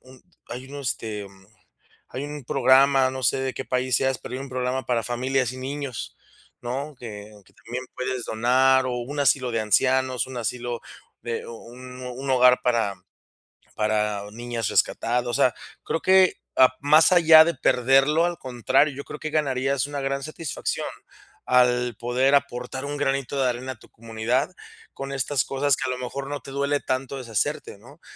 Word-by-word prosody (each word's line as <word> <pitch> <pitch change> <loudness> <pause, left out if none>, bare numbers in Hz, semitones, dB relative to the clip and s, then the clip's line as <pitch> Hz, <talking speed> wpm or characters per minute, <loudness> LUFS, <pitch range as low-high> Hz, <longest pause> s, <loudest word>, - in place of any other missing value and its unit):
un 130 0 -17 0.3
hay 130 +2 -7
un 145 +1 -7
este 110 -6 -4 0.8
hay 130 - -5
un 145 -1 -7
programa, 135 +1 +4
no 130 - -6
sé 120 - +2
de 130 -1 -2
qué 135 - -6
país 130 -1 0
seas, 135 -1 0
pero - - -9
hay 130 - -3
un 135 -1 -7
programa 130 0 -2
para 120 -2 +1
familias 125 +1 -1
y - - -9
niños, 135 -1 -5 0.4
¿no? 135 +5 -4
Que 105 -3 -9
que - - -25
también 120 +3 -7
puedes 130 -1 -3
donar, 130 +3 +3
o 125 - -2
un 140 +5 -5
asilo 130 -2 +2
de 115 - 0
ancianos, 130 +4 +2
un 130 -1 -7
asilo 120 +1 -3 0.4
de 120 -1 -4
u - - -9
u 115 - -12
un 125 0 -10
un 125 +2 -6
hogar 125 -1 +5
para 115 -5 +1 0.8
para 105 -1 0
niñas 120 -1 -4
rescatadas, 120 +1 +1
o 120 - -2
sea, 120 0 +3 0.3
creo 165 - -2
que 190 -1 +4 0.4
más 155 +5 +5
allá 160 -2 +8
de 170 - 0
perderlo, 135 +5 +3
al 175 -1 -2
contrario, 130 +3 +1
yo 140 +1 -7
creo 150 - -8
que 155 - -5
ganarías 135 -3 0
una 145 -1 -5
gran 135 0 -2
satisfacción 155 0 -4 0.6
al 125 -2 +3
poder 125 +4 +1
aportar 130 -1 -1
un 145 0 -4
granito 135 -1 -1
de 130 - +3
arena 125 +2 -3
a 120 - -14
tu - - -19
comunidad 115 +6 -2 0.4
con 135 0 -7
estas 135 0 0
cosas 140 0 +1
que - - -4
a - - 0
lo 125 - -4
mejor 135 +2 -5
no 145 0 -4
te - - -11
duele 140 +1 0
tanto 130 +1 -3
deshacerte, 115 -5 -3
¿no? - - -17
130 Hz, 180 wpm, -24 LUFS, 120-140 Hz, 0.8 s, allá